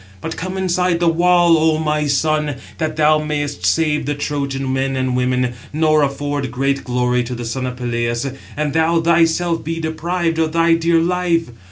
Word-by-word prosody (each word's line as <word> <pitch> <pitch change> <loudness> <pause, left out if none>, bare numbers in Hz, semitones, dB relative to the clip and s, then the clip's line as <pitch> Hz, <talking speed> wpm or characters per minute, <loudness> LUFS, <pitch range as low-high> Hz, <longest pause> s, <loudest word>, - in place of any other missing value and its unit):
But 160 - -5
come 185 +2 -5
inside 180 -2 +1
the 175 - +1
wall, 175 0 +4
O 160 0 +2
my 150 -1 0
son, 150 +1 0 0.2
that 155 -1 -2
thou 155 0 +4
mayest 145 -11 -2
save 150 - +1
the 145 - -1
Trojan 140 -2 -3
men 135 0 -1
and 130 -1 -1
women, 125 -1 0 0.2
nor 155 0 +2
afford 145 -1 -2
great 135 +2 -1
glory 125 0 0
to 125 +1 -5
the 120 0 -6
son 130 +3 -3
of 125 - -5
Peleus, 120 0 -2 0.3
and 150 -1 -1
thou 160 +1 +2
thyself 165 0 +2
be 165 +1 -3
deprived 165 +1 -2
of 160 -1 0
thy 165 0 +3
dear 165 0 +2
life. 170 -3 0
150 Hz, 180 wpm, -18 LUFS, 135-165 Hz, 0.3 s, wall